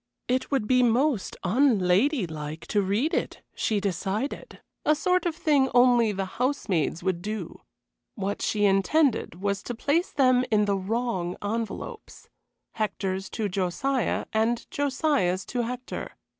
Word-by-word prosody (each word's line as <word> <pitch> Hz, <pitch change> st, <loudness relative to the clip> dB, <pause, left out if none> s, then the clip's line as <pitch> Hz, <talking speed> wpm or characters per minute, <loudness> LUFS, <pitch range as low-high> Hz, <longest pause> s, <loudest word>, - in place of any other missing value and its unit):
It 255 Hz, +1 st, 0 dB
would 270 Hz, -7 st, 0 dB
be 255 Hz, +3 st, +4 dB
most 245 Hz, -1 st, +1 dB
unladylike 185 Hz, -, +1 dB
to 205 Hz, -, +2 dB
read 205 Hz, +11 st, 0 dB
it, -, -, -2 dB
she 215 Hz, -2 st, 0 dB
decided 200 Hz, -, -3 dB, 0.2 s
a 305 Hz, -, +4 dB
sort 360 Hz, +3 st, +1 dB
of 330 Hz, -, -2 dB
thing 285 Hz, -5 st, +2 dB
only 245 Hz, -3 st, +5 dB
the 195 Hz, -1 st, -2 dB, 0.2 s
housemaids 190 Hz, -, 0 dB
would 185 Hz, -2 st, -1 dB
do. 210 Hz, -3 st, -5 dB, 0.5 s
What 200 Hz, +1 st, -3 dB
she 210 Hz, -1 st, +1 dB
intended 200 Hz, -, +2 dB
was 200 Hz, 0 st, 0 dB
to 240 Hz, -, -5 dB
place 300 Hz, +9 st, +1 dB
them 255 Hz, -3 st, +4 dB
in 210 Hz, -1 st, +3 dB
the 200 Hz, -1 st, +1 dB
wrong 195 Hz, -3 st, -2 dB
envelopes 230 Hz, -, -5 dB, 0.4 s
Hector's 195 Hz, -3 st, -2 dB
to 215 Hz, -, -2 dB
Josiah, 200 Hz, +8 st, -1 dB
and 225 Hz, +2 st, +1 dB
Josiah's 275 Hz, -, 0 dB
to 245 Hz, -, -2 dB
Hector. 250 Hz, +2 st, -5 dB
220 Hz, 135 wpm, -26 LUFS, 195-265 Hz, 0.5 s, only